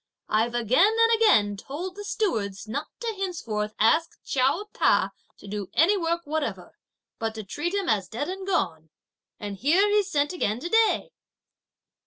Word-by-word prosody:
I've 230 +3 +1
again 255 - +3
and 455 0 +4
again 205 - +4
told 330 - -6
the 410 - -7
stewards 220 - -2
not 285 +8 -3
to 460 -2 -2
henceforward 230 - -3
ask 315 +10 +3
Chiao 275 +10 +1
Ta - - +3 0.3
to - - -13
do 200 -1 -5
any 355 +7 +5
work 340 -2 -1
whatever, 310 -1 -4 0.4
but 225 -1 -2
to 220 - -5
treat 340 - -3
him 395 -2 -1
as 205 -5 +1
dead 245 +6 -4
and 380 +1 -6
gone; 165 - -1 0.5
and 205 -1 -6
here 335 - +3
he's 410 -1 +2
sent 290 -1 0
again 220 - -1
to 345 - -4
day." 450 +3 +2
295 Hz, 165 wpm, -26 LUFS, -, 0.5 s, any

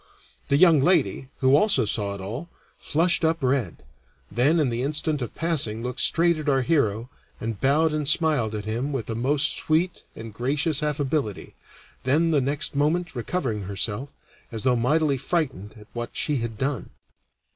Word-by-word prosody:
The 140 - +3
young 165 -2 +6
lady, 145 -5 +1
who 130 +1 +5
also 150 - +3
saw 100 -1 -2
it 100 - -8
all, 120 - -6 0.3
flushed 170 +3 +1
up 160 -1 +1
red, 125 - -1 0.5
then 145 +8 +3
in 140 -6 +1
the 115 +1 -2
instant 150 +1 -1
of 120 - -5
passing 135 -10 -1
looked 125 +1 -4
straight 170 -1 +3
at 150 -1 -2
our 135 -2 +2
hero, 120 -5 0 0.3
and 110 -2 -5
bowed 150 +4 +3
and 150 -2 -2
smiled 150 -8 +2
at 105 -1 -5
him 120 +6 -2
with 125 -5 -3
a - - -1
most 140 +6 +2
sweet 165 +3 0
and 115 -1 -9
gracious 145 +6 0
affability, 145 -7 -2 0.5
then 155 +6 +2
the 145 -3 +3
next 140 +2 -2
moment 155 +4 0
recovering 120 - -2
herself, 105 +7 -3 0.4
as 110 -3 -5
though 125 -1 +3
mightily 140 +4 +2
frightened 135 - -2
at 105 - -14
what 120 0 -4
she 150 -2 -1
had 115 -2 -4
done. 135 -1 -2
135 Hz, 170 wpm, -25 LUFS, 115-155 Hz, 0.5 s, young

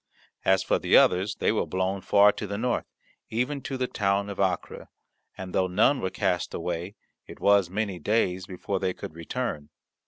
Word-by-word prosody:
As 95 0 +3
for - - +1
the - - +4
others, 95 +3 +3
they - - +1
were - - -1
blown 95 +1 -1
far 100 +1 +5
to 105 - -6
the 100 +1 -4
north, 120 +2 -1 0.4
even 125 +5 -1
to 135 - -4
the 130 - 0
town 100 -3 0
of 100 - -8
Acre, 95 -3 -2 0.5
and, 95 -1 -7
though 95 - +2
none 110 +9 +3
were 95 - -1
cast 90 -1 -1
away, 85 +3 -4 0.3
it - - -11
was 100 -3 +4
many 100 -1 -2
days 95 0 0
before 95 +1 -3
they 90 - -1
could - - -8
return. 85 -2 -4
95 Hz, 185 wpm, -26 LUFS, 90-105 Hz, 0.5 s, far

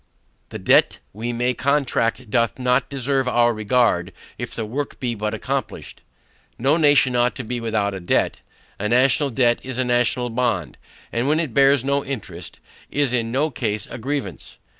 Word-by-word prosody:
The - - -6
debt - - +3 0.2
we 115 +4 -4
may 120 +1 0
contract 130 -4 0
doth 115 -2 +1
not 125 0 +1
deserve 135 -1 -1
our 120 -1 +3
regard 110 -5 +1 0.3
if - - -5
the 115 - -2
work 135 +6 -4
be 125 -2 -2
but 105 0 -3
accomplished. 105 - -4 0.6
No 135 +5 +2
nation 145 -5 +4
ought 120 0 +2
to 130 - -5
be 120 +1 -4
without 110 -3 -1
a 95 - -5
debt. 85 - 0 0.4
A 105 +1 -1
national 130 +4 +3
debt 120 -1 +2
is 130 -1 -6
a 130 - 0
national 120 0 +1
bond; 115 -8 -1 0.3
and 120 +3 -1
when 155 +2 +2
it 155 -8 -2
bears 135 -1 +4
no 140 0 +1
interest, 95 -10 -7 0.3
is 140 -3 0
in 115 -2 0
no 145 +5 0
case 110 -4 -1
a 120 - -6
grievance. 120 - -4
125 Hz, 175 wpm, -22 LUFS, 115-135 Hz, 0.6 s, nation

